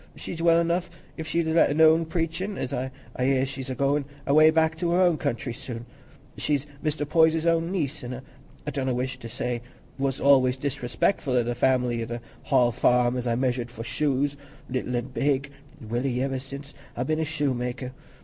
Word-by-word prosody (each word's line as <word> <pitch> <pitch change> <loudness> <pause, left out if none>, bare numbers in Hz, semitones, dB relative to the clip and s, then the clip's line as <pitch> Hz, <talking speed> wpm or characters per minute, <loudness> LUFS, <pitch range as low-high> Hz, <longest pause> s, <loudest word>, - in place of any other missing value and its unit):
She's 165 - -6
well 170 0 +5
enough 170 +1 0 0.3
if 160 -1 -6
she'd 170 +1 0
let 160 +1 +4
alone 160 +2 +5
preachin'; 170 +4 -2
an' 130 0 -2 0.3
I 125 - -1
hear 130 0 +3
as 135 - -2
she's 135 -1 -6
a 130 - -2
goin' 140 +2 +1 0.2
away 155 +3 +6
back 160 0 +2
to 175 -1 0
her 180 - +3
own 175 -4 +4
country 120 0 -2
soon. 115 0 -7 0.5
She's 145 -2 0 0.2
Mr. 150 -1 -1
Poyser's 160 +1 +4
own 165 +1 +2
niece, 155 -7 -2
an' 125 +1 -5 0.5
I 150 - -2
donna 130 -3 -1
wish 130 +1 -3
to 115 - -8
say 120 0 -3 0.4
what's 135 -1 -1
anyways 130 -2 +4
disrespectful 130 +1 -1
o' 120 - +4
th' 120 +1 -2
family 125 -2 +2
at 115 - -4
th' 120 0 -3 0.3
Hall 120 -1 +4
Farm, 125 +2 +3
as 125 -1 -2
I've 115 0 +1
measured 125 -2 0
for 115 -1 -8
shoes, 140 +2 0 0.4
little 125 -1 -2
an' 120 +1 -2
big, 140 +1 0 0.3
welly 125 +2 -1
iver 135 -1 -1
sin' 140 +2 -8 0.3
I've 125 - -1
been 155 +3 0
a - - +1
shoemaker. 130 -5 -2
135 Hz, 190 wpm, -26 LUFS, 125-160 Hz, 0.5 s, away